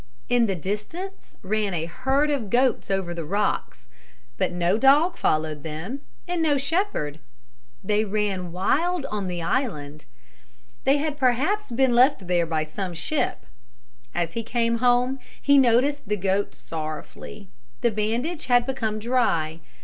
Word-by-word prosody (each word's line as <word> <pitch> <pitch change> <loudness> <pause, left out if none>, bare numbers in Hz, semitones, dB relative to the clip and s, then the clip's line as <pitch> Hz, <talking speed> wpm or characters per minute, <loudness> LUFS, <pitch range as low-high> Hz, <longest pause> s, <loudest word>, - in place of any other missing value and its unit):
In 245 -2 +4
the 195 - 0
distance 210 - -6
ran 205 -1 0
a 165 -1 -1
herd 265 - +1
of 250 -8 -2
goats 250 +3 +2
over 190 -3 -1
the 170 -1 -4
rocks. 200 - -2 0.5
But - - 0
no 175 +1 +1
dog 295 +7 +5
followed 155 -1 0
them 160 - -5 0.3
and 350 -1 -1
no 300 -3 +3
shepherd. 280 - -1 0.6
They 210 +2 +2
ran 200 -4 -1
wild 295 - +1
on 205 -2 -2
the 175 -2 -3
island. 150 - -2 0.8
They 275 +2 +5
had 295 0 -2
perhaps 280 - +1
been 250 +1 +2
left 250 -3 +4
there 175 -1 +1
by 160 -1 0
some 175 +3 -5
ship. 220 - -1 0.7
As 170 -1 -1
he 230 - -2
came 230 0 0
home 250 +2 +3 0.2
he 280 0 +5
noticed 255 0 +3
the 210 - +1
goat 195 -4 0
sorrowfully. 155 - -7 0.3
The 235 - +3
bandage 235 +11 -2
had 245 -1 +4
become 225 -5 -2
dry. 210 -9 0
215 Hz, 145 wpm, -25 LUFS, 175-270 Hz, 0.8 s, dog